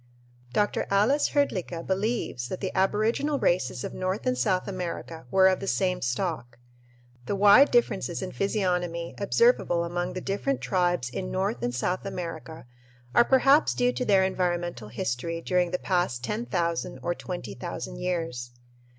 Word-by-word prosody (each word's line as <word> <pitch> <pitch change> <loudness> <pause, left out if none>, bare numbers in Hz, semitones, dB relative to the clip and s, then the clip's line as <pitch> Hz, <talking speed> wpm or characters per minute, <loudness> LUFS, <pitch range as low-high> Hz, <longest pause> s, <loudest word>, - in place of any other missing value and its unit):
Dr. 205 +10 0
Ales 220 +9 +3
Hrdlicka 185 - -1
believes 190 - -1
that 185 - -5
the 190 - -3
aboriginal 215 +9 +1
races 175 - 0
of - - -5
North 185 +5 -3
and 255 0 +2
South 185 -6 0
America 170 -6 -5
were 190 +4 +5
of 185 -1 +2
the 195 - -5
same 185 -1 0
stock. 125 -1 -2 0.7
The - - 0
wide 205 +8 +7
differences 485 -1 +1
in - - -5
physiognomy 180 -4 -1
observable 200 - +3
among 175 +1 -3
the 185 - -4
different 205 +9 -1
tribes 175 -8 0
in 185 +8 -4
North 195 +4 -1
and 120 0 -2
South 180 +9 -1
America 165 -5 -6 0.5
are 240 - +6
perhaps 270 +4 +4
due 245 0 +2
to - - -2
their 195 -5 +4
environmental 175 - -1
history 125 +9 -3
during 180 +1 +1
the 180 - -1
past 175 -12 -1
10,000 175 - -2
or 175 - 0
20,000 105 - -6
years. 165 -9 -3
185 Hz, 150 wpm, -27 LUFS, 170-205 Hz, 0.7 s, wide